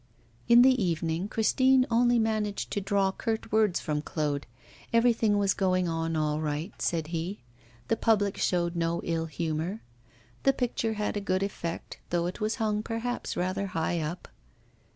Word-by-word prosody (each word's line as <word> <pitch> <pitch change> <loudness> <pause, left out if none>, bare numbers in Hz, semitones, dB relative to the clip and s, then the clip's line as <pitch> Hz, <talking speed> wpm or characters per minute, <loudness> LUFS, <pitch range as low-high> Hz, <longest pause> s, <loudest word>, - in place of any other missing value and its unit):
In 240 0 +8
the 255 -4 +4
evening 165 +1 -1
Christine 260 +4 +3
only 240 +1 +4
managed 215 -2 -1
to 205 - -1
draw 195 0 +1
curt 220 +2 -3
words 215 -4 +3
from 150 -2 -2
Claude; 150 -2 -2 0.4
everything 230 -3 +3
was 200 -1 +2
going 185 -2 +1
on 165 0 -1
all 155 0 0
right, 155 +5 -3
said 160 -2 -1
he; 170 +1 -4 0.4
the - - +2
public 205 -3 +2
showed 175 -1 0
no 170 0 0
ill 165 -1 -1
humour; 160 +5 -3 0.6
the 270 - +4
picture 230 -3 -1
had 210 0 -2
a - - -2
good 190 -1 0
effect, 170 -4 -5
though 170 -1 0
it 180 +4 -5
was 215 +1 0
hung 210 -1 0
perhaps 230 +2 -3
rather 185 +2 -1
high 165 +1 0
up. 160 +3 -4
190 Hz, 160 wpm, -28 LUFS, 165-220 Hz, 0.6 s, In